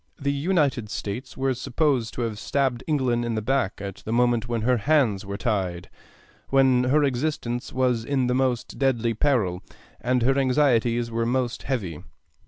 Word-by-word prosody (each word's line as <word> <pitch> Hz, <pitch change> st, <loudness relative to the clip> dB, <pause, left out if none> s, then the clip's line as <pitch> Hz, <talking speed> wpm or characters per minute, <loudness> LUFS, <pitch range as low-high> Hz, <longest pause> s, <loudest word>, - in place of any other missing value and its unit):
The 140 Hz, -1 st, 0 dB
United 140 Hz, -, 0 dB
States 105 Hz, +5 st, -5 dB
were 135 Hz, 0 st, +1 dB
supposed 125 Hz, -1 st, 0 dB
to -, -, -3 dB
have 110 Hz, -3 st, -3 dB
stabbed 130 Hz, -2 st, 0 dB
England 130 Hz, -6 st, +1 dB
in 120 Hz, -1 st, -2 dB
the 110 Hz, -, -1 dB
back 130 Hz, -4 st, +1 dB
at 100 Hz, -1 st, -6 dB
the 110 Hz, -, -7 dB
moment 120 Hz, 0 st, +2 dB
when 120 Hz, -2 st, -1 dB
her 125 Hz, +2 st, +2 dB
hands 115 Hz, -7 st, +1 dB
were 100 Hz, 0 st, -4 dB
tied, 95 Hz, -7 st, -2 dB, 0.6 s
when 130 Hz, -2 st, +4 dB
her 145 Hz, +4 st, +3 dB
existence 125 Hz, -3 st, -2 dB
was 125 Hz, -3 st, +1 dB
in 135 Hz, 0 st, 0 dB
the 125 Hz, -, +1 dB
most 125 Hz, -2 st, -1 dB
deadly 120 Hz, -4 st, +1 dB
peril 110 Hz, -8 st, +1 dB, 0.4 s
and 125 Hz, 0 st, +1 dB
her 135 Hz, +3 st, +3 dB
anxieties 120 Hz, -3 st, +2 dB
were 115 Hz, 0 st, -1 dB
most 125 Hz, -1 st, -1 dB
heavy. 100 Hz, -, -3 dB
125 Hz, 170 wpm, -25 LUFS, 115-135 Hz, 0.6 s, when